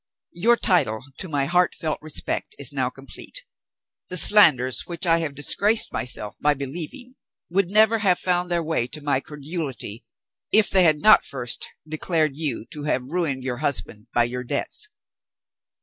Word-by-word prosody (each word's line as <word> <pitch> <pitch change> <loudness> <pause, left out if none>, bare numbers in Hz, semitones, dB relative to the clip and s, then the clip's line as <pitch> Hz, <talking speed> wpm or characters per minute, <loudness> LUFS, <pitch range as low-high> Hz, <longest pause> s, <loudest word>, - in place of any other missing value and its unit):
Your 225 +8 +3
title 140 - +1 0.2
to 185 - -6
my 140 -3 0
heart 180 +4 +1
felt 155 -1 -3
respect 155 - -2
is - - -2
now - - 0
complete. - - -9 0.6
The 180 - 0
slanders 150 - +6
which 175 +2 -5
I 165 -1 +3
have 150 -4 -4
disgraced 205 +9 +2
myself 105 -4 -4
by 150 0 +2
believing 170 - -6 0.3
would 185 0 +1
never 220 +2 +4
have 190 -4 +2
found 180 -1 -1
their 170 -1 0
way 155 -7 -1
to 150 +4 -8
my 140 -2 +1
credulity, 140 - -6 0.5
if 215 0 +4
they 190 - +4
had 155 -2 +4
not 215 - +6
first 125 -3 -2 0.2
declared 155 0 0
you 140 -7 -2
to 150 -1 -7
have 130 -2 -2
ruined 155 -7 -1
your 125 -2 -3
husband 120 -5 -1
by 120 - +3
your 125 +1 -4
debts. 120 - -2
155 Hz, 165 wpm, -23 LUFS, 135-180 Hz, 0.6 s, slanders